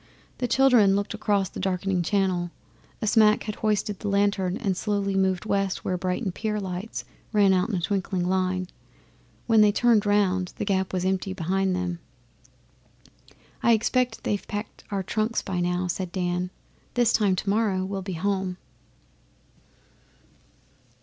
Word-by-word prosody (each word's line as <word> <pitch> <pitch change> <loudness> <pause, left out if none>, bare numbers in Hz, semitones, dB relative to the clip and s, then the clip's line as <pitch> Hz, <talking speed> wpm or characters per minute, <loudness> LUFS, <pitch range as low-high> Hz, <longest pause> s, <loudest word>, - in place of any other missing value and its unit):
The 245 - 0
children 240 -6 +5
looked 205 +2 -1
across 205 -2 +1
the - - -8
darkening 190 -1 0
Channel. 180 -1 0 0.5
A - - +1
smack 215 0 +4
had 215 - -4
hoisted 210 -1 -1
a - - -2
lantern 200 -2 +1
and 200 -6 -1
slowly 200 0 -1
moved 190 -1 +1
west 195 -2 -1
where 185 - 0
Brighton 185 +3 -2
pier 210 +3 -2
lights 190 +2 -5 0.3
ran 205 -3 +4
out 185 +3 +1
in 210 - -1
a 175 - -1
twinkling 185 -1 -1
line. 185 0 0 0.8
When 225 -2 +5
they 210 -1 +6
turned 220 -1 +3
round 190 -3 +1
The - - -2
Gap 190 -2 0
was 185 -1 -1
empty 190 0 -1
behind 190 +1 0
them. 180 -2 -3 1.6
'I 235 - +5
expect 235 +2 +1
they've 205 - -2
packed 205 +1 -6
our 200 -2 -2
trunks 215 +4 -1
by 190 -3 -3
now,' 180 +1 0
said 180 0 -3
Dan. 180 -1 -1 0.5
'This 240 -2 +3
time 200 -4 +3
tomorrow 200 -1 0
we'll 195 0 -4
be 190 0 -5
home. 190 +1 -1
195 Hz, 150 wpm, -25 LUFS, 185-210 Hz, 1.6 s, they